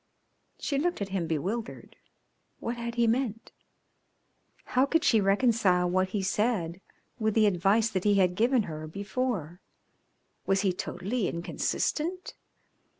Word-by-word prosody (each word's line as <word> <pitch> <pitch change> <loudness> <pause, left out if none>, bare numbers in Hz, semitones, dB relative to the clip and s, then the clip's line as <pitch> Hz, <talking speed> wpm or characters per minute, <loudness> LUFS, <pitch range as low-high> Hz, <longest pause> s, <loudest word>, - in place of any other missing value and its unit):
She 280 -2 -1
looked 350 +4 0
at 200 -1 -3
him 185 -3 -2
bewildered. 190 +9 -4 0.6
What 235 - -3
had 235 0 -5
he 235 -1 +3
meant? 230 -1 -1 1.2
How 255 +2 +4
could 325 +2 +2
she 220 -3 +4
reconcile 195 -3 +3
what 185 +1 +1
he 195 0 -2
said 195 -4 0 0.4
with 220 -1 0
the 220 -1 +5
advice 205 +4 +2
that 185 -3 -1
he 205 -1 +3
had 185 -2 +3
given 235 +4 +2
her 155 -3 -6
before? 200 - -3 0.9
Was 195 0 +3
he 195 -2 +1
totally 200 +4 -2
inconsistent? 320 - -2
205 Hz, 135 wpm, -28 LUFS, 185-235 Hz, 1.2 s, the